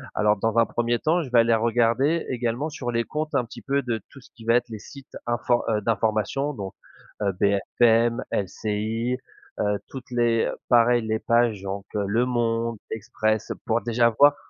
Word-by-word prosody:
Alors, 105 0 +3
dans 115 +3 -1
un 115 - +6
1er 120 +1 -1
temps, 170 +3 +2
je 135 - -8
vais 120 - +5
aller 115 0 +4
regarder 120 +7 +2
également 125 +3 -1
sur 125 -5 -4
les 115 0 0
comptes 155 0 -4
un 125 - +2
petit 115 - -11
peu 140 +1 0
de 115 -3 -3
tout 135 - -13
ce - - -19
qui 115 - -13
va 115 +1 +4
être 120 0 +2
les 110 -2 -7
sites 140 +5 -13
infor 120 0 +1
heu, 110 -1 +2
d'information, 110 +6 0
donc 100 -5 -6 0.5
heu, 100 -1 +1
BFM, 115 +4 +3
LCI, 110 +5 -2 0.4
heu, 105 -1 0
toutes 130 -1 -10
les 120 -2 +2 0.2
pareil 120 0 +5
les 110 0 0
pages 115 -4 +2
donc 100 0 -5
Le 105 +4 +1
Monde, 115 -2 0
l'Express 110 0 -1
pour 115 +1 +1
déjà 120 0 +3
voir 145 +1 +7
115 Hz, 180 wpm, -24 LUFS, 110-125 Hz, 0.5 s, voir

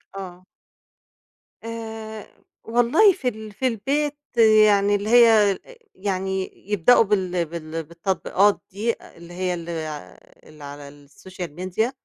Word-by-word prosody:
آه. 185 -2 -9 1.2
آآ 220 -1 -7 0.4
والله 245 - +4
في 330 -8 -5
ال 220 -2 -4
في 255 +6 -1
البيت 280 +6 -1 0.5
يعني 205 -1 +3
اللي 205 +2 -3
هي 225 -4 +6
ا - - -11 0.4
يعني 190 -1 -3 0.2
يبدؤوا 205 +5 +5
بال 185 -4 0
بال 165 0 -6
بالتطبيقات 190 +4 0
دي، 220 +4 -1
اللي 170 +1 -14
هي 180 0 -2
ال 170 -1 -7
ع 155 - -5 0.4
اللي 155 -1 -14
على 145 0 -11
الSocial 180 +4 -8
media 190 +6 -1
195 Hz, 125 wpm, -23 LUFS, 170-225 Hz, 1.2 s, هي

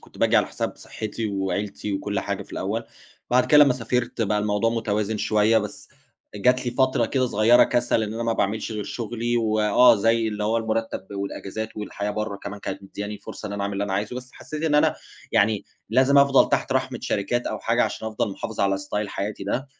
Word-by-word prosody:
كنت - - -17
باجي - - +3
على - - +4
حساب - - -4
صحِّتي 110 +1 -5
وعيلتي 100 +1 -3
وكل 100 +1 -2
حاجة 100 0 -3
في - - -17
الأول. 110 +5 -2 0.5
بعد 125 +1 +4
كده 150 -1 +8
لمّا 140 - +3
سافرت 120 -1 -1
بقى 105 0 +1
الموضوع 105 +2 +1
متوازن 110 -2 -1
شوية، 110 +2 +3
بس 105 -1 -7 0.5
جات 125 +5 +2
لي - - +1
فترة 130 +1 +2
كده 130 -2 +1
صغيرة 115 +2 +5
كَسَل، 120 -2 +1
إن 110 0 -3
أنا 115 - -3
ما 115 0 +1
باعملش 110 +1 -1
غير 105 -1 -4
شغلي 120 +2 -2
و 110 -2 +1
آه، 105 +4 +6
زي 115 +2 +2
اللي 105 0 -3
هو 110 +2 +1
المُرتَّب 115 -3 -2
والأجازات 100 +2 -5
والحياة 105 -1 -4
برّه 105 -1 -3
كمان 100 +1 -8
كانت - - -5
مدّياني 105 +1 -6
فرصة - - -8
إن - - -6
أنا 100 0 -3
أعمل 100 0 -2
اللي 100 +1 -1
أنا 100 - -4
عايزه، 105 +5 -2
بس 125 0 -8
حسّيت 155 0 -7
إن 160 -2 +1
أنا 150 - +4 0.4
يعني 105 0 +2 0.3
لازم 130 +4 +5
أفضل 140 -1 +5
تحت - - 0
رحمِة 130 -1 -1
شركات 120 +1 -1
أو - - -3
حاجة 120 +1 +1
عشان 110 - -4
أفضل 110 -1 -2
محافِظ 110 +3 -5
على 100 0 +2
style 105 +2 -3
حياتي 100 +1 -4
ده. 130 +7 -2
110 Hz, 210 wpm, -24 LUFS, 100-120 Hz, 0.5 s, كده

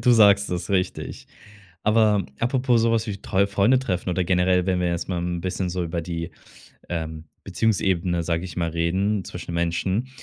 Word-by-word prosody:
Du 125 - +4
sagst 105 -2 +5
es, 90 +1 -3
richtig. 95 -2 -2 0.6
Aber 105 -3 +3
apropos 125 0 +2
so 115 0 +3
was 115 0 +1
wie 100 -1 -3
treue 100 +1 +1
Freunde 105 +6 +3
treffen 95 -7 -2
oder 90 +1 0
generell, 90 0 +2
wenn 90 -1 +1
wir 90 - +1
jetzt 85 0 -2
mal 90 - -1
'n 85 0 -3
bisschen 90 0 -2
so 90 0 -2
über 85 0 -3
die, 85 0 -5 0.6
ähm, 80 -2 -4 0.2
Beziehungsebene, 95 -5 0
sage 85 +1 -1
ich 90 -2 -8
mal, 85 -1 0
reden, 95 +5 0
zwischen 85 -1 -7
Menschen. 90 +8 -1
90 Hz, 180 wpm, -24 LUFS, 85-105 Hz, 0.6 s, sagst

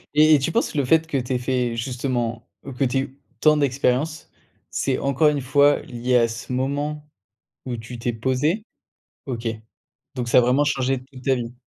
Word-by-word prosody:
et 155 +1 +6
et - - +3
tu 135 - -1
penses 230 -7 0
le 140 -3 +1
fait 160 +4 +4
que 140 - -1
tu 125 0 -2
aies - - +2
fait, 125 -1 -1
justement 120 -1 -2 0.3
que - - +1
tu 130 +1 +1
aies - - +3
eu 135 +1 -8 0.2
tant 155 -1 +5
d'expériences, 140 +3 0 0.4
c'est, 135 -2 0
encore 140 +3 +3
une 145 -2 -1
fois, 140 +3 +4
lié 125 0 -2
à 115 -1 +4
ce 115 +2 -7
moment 145 +3 -2 0.6
où 120 -2 -3
tu 115 +1 -8
t'es 120 +1 -1
posé? 130 - 0 0.6
OK. 120 -3 -4 0.7
Donc 120 -2 -3
ça 120 - +5
a - - +9
vraiment 125 +4 +3
changé 135 -2 0
toute 130 -1 -12
ta 135 -1 +3
vie? 120 0 -5
130 Hz, 195 wpm, -23 LUFS, 125-145 Hz, 0.7 s, a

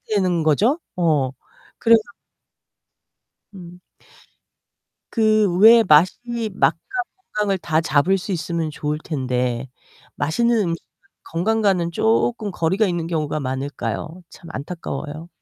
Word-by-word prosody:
되는 180 -4 +1
거죠. 215 - +2 0.2
어, 150 -7 +1 0.5
그래서 230 -1 +5 1.5
음. 180 -1 -12 1.3
그 215 -2 +3
왜 230 +2 +8
맛이 220 +7 +2
맛과 195 - +2 0.6
건강을 205 -2 +1
다 160 -2 0
잡을 160 +6 +2
수 190 +2 -6
있으면 170 -2 -2
좋을 150 0 -3
텐데 125 -4 -2 0.5
맛있는 235 +11 +1
음식은 170 -4 -1 0.6
건강과는 185 -1 +1
조끔 220 +2 +1
거리가 190 +6 +1
있는 170 -2 -2
경우가 155 -2 -2
많을까요? 135 - -4
참 170 - -14
안타까워요. 155 +1 -6
170 Hz, 230 characters per minute, -21 LUFS, 150-210 Hz, 1.5 s, 왜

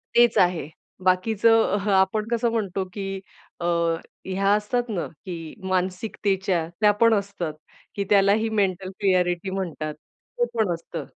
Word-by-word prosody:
तेच 240 -1 +5
आहे. 175 -5 +2 0.3
बाकीचं 220 +4 +4
अहं, 205 0 -1
आपण 190 +3 +2
कसं 235 0 +2
म्हणतो, 200 -4 -1
की 195 -1 -4 0.4
अ, 170 - -3 0.6
ह्या 195 +1 +1
असतात 210 +4 0
ना? 185 -5 -2 0.2
की 165 -4 -6 0.2
मानसिकतेच्या, 185 -1 0
त्या 210 -1 +6
पण 230 -1 +6
असतात, 200 -6 -2 0.4
की 200 - -1
त्यालाही 205 +2 +4
मेंटल 195 -3 0
क्लिअरिटी 180 -2 +1
म्हणतात. 170 -5 -3 0.5
ते 485 - +4
पण 220 -6 +1
असतं. 165 0 -6
195 Hz, 135 wpm, -24 LUFS, 180-215 Hz, 0.6 s, त्या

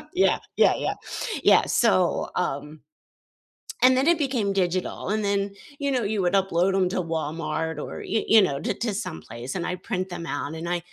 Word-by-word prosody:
Yeah, 375 - +3 0.2
yeah, - - +6
yeah, - - 0 0.6
yeah. - - +6 0.2
So, 185 -7 +2 0.2
um 140 -2 -3 1.2
and 255 0 +7
then 265 +3 +2
it 340 - -2
became 260 -8 0 0.2
digital 180 +1 -3
and 215 0 0
then, 200 0 +2 0.4
you 280 - +1
know, 255 -3 +1
you 215 - -1
would 180 +2 +1
upload 190 0 +1
'em 185 - +3
to 185 - -1
Walmart 160 0 -2
or, - - -7 0.2
y 220 - +3
you 215 - +9
know, 140 - -2
t - - 0
to 230 - 0 0.2
someplace, 115 +10 -7
and 175 - -2
I - - -1
print 185 -4 -1
them 170 -1 -6
out 145 - -4
and 165 - -5
I 175 0 0
185 Hz, 190 wpm, -25 LUFS, 160-220 Hz, 1.2 s, you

